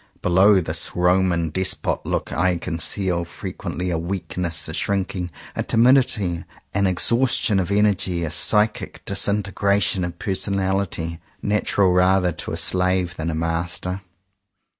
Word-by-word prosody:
Be - - 0
low 95 +3 +5
this 80 -1 -2
Roman 90 -2 +2
Despot 95 +3 -1
look - - -2
I 90 0 +1
conceal 85 +2 -1
fre 85 - -7
quently 90 0 -4
a 80 - -1
weakness, 85 -1 -3
a 80 - -5
shrinking, 95 -1 -2 0.3
a - - -1
timidity, 115 -8 +2 0.3
an 100 0 +2
exhaustion 115 +2 +2
of 90 - -2
energy, 100 -4 +1
a 80 - -3
psychic 105 +5 +1
disinte 100 +1 +1
gration 100 -2 +1
of 85 0 -5
personality, 95 -3 -2 0.2
natural 100 -2 +2
rather 90 0 +3
to - - -6
a - - -3
slave 90 -1 0
than 80 0 -3
a 80 - -2
master. 85 +3 -2
90 Hz, 140 wpm, -22 LUFS, 85-100 Hz, 0.3 s, low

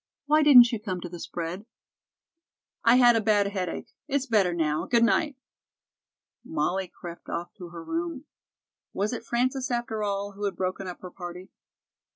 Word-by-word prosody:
"Why 305 +2 +4
didn't 250 -6 +8
you 230 - -2
come 190 -4 -4
to 175 - -6
the 175 0 -8
spread?" 175 +7 -5 1.2
"I 230 +1 +6
had 245 -2 +6
a 225 - +2
bad 205 -2 +3
headache. 185 -4 -4 0.2
It's 280 -2 0
better 210 -8 +3
now. 160 -2 -1
Good 235 -1 +3
night." 290 +5 +2 1.1
Molly 175 +5 -1
crept 170 -1 -10
off 175 +1 -4
to 175 -2 -8
her 170 -1 -9
room. 330 - -4 0.7
Was 205 +4 -1
it 230 - -5
Frances, 255 +3 0
after 240 -3 -2
all, 200 0 -2
who 205 +1 -5
had 200 - -2
broken 185 +1 -3
up 180 - -7
her 180 - -8
party? 180 0 -9
205 Hz, 170 wpm, -27 LUFS, 180-240 Hz, 1.2 s, didn't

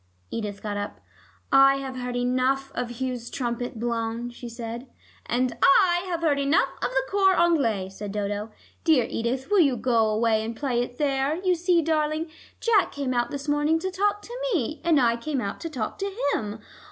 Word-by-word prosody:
Edith 205 -3 -4
got 205 -1 -3
up. 205 - -5 0.5
"I 275 0 +7
have 270 -1 -5
heard 250 -1 -4
enough 255 +2 0
of 245 -1 -3
Hugh's 250 -2 -3
trumpet 245 -1 -3
blown," 235 0 -2
she 240 0 -9
said. 235 +2 -6 0.4
"And 250 +1 0
I 360 -1 +5
have 340 -2 -2
heard 290 -3 +2
enough 280 +3 +2
of - - 0
the - - +1
cor 385 -1 +3
anglais," 265 - +2
said 200 +1 -7
Dodo. 205 +1 -3 0.3
"Dear 305 -8 +4
Edith, 255 - -3
will 410 - +5
you 280 -7 +4
go 230 -2 +2
away 220 0 +2
and 225 +1 -4
play 245 -2 0
it 245 0 -5
there? 280 0 +1
You 365 +1 +1
see, 350 -1 +2
darling, 310 +1 0 0.3
Jack 445 -4 +3
came 275 -3 -2
out 240 -1 0
this 285 +1 -6
morning 295 +2 +2
to 375 +3 -3
talk 410 +2 0
to 475 - -8 0.2
me, 305 +1 -2
and 330 -4 +4
I 235 -2 +3
came 275 +3 -2
out 200 -5 -4
to 330 - -5
talk 245 -8 -4
to 395 0 -2 0.2
him. 210 0 -3
260 Hz, 190 wpm, -25 LUFS, 235-320 Hz, 0.5 s, I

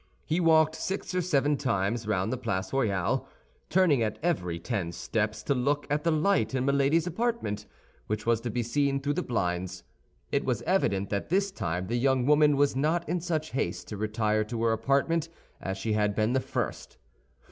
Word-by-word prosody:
He 160 - 0
walked 160 -2 +4
six 190 +3 -4
or 180 - +1
seven 145 -4 +2
times 110 -3 -1
round 105 +1 0
the - - -2
Place 95 -5 -3
Royale, 100 -9 0 0.4
turning 170 -8 +4
at 110 -1 -1
every 90 - 0
ten 90 -1 -3
steps 105 +4 -2
to 140 - +1
look 140 +3 0
at 150 0 +1
the 170 - +2
light 155 - +2
in 130 0 0
Milady's 140 +4 +3
apartment, 180 - -2 0.4
which 105 0 -2
was 115 -1 +2
to 120 - -3
be 120 +2 -1
seen 140 +3 +1
through 145 +1 -1
the - - -1
blinds. 90 -5 -2 0.5
It - - +1
was - - -1
evident 100 0 +1
that 100 -1 -2
this 195 +3 +1
time 90 - -3
the 120 +5 -1
young 130 -1 +2
woman 150 0 +5
was 145 -2 +3
not 160 +5 +1
in 175 +2 -1
such 160 -3 -2
haste 135 - -2
to 105 - -5
retire 110 0 0
to 115 +1 -3
her 115 - +3
apartment 140 +8 +1 0.3
as 95 0 -3
she 110 +3 -1
had 105 -1 +1
been 110 +2 +1
the 130 - +3
first. - - -4
130 Hz, 190 wpm, -28 LUFS, 105-155 Hz, 0.5 s, woman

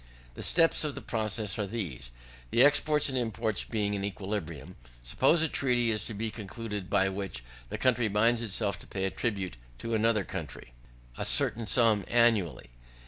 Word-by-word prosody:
The - - -9
steps 165 -1 +3
of 150 -2 -3
the - - -6
process 110 -2 -2
are 105 - -1
these. 90 - -5 0.4
The 120 - +5
exports 150 +1 +4
and 135 - -2
imports 110 -3 0
being 105 -3 -1
in 100 -1 -2
equilibrium, 95 -5 -5 0.3
suppose 155 - +3
a - - +3
treaty 120 -6 +2
to 105 +2 -3
be 110 +2 -3
concluded, 105 -2 -6
by 95 -1 +3
which 95 -10 -4 0.3
the - - -4
country 125 -3 +2
binds 115 +3 +2
itself 100 -3 -1
to - - -13
pay 95 - -4
in 95 - 0
tribute 95 - -2 0.2
to 115 - -4
another 110 -1 +2
country, 80 -10 -7 0.5
a - - -1
certain 115 -1 +2
sum 115 -5 +3
annually. 115 - +2
110 Hz, 170 wpm, -29 LUFS, 95-115 Hz, 0.5 s, The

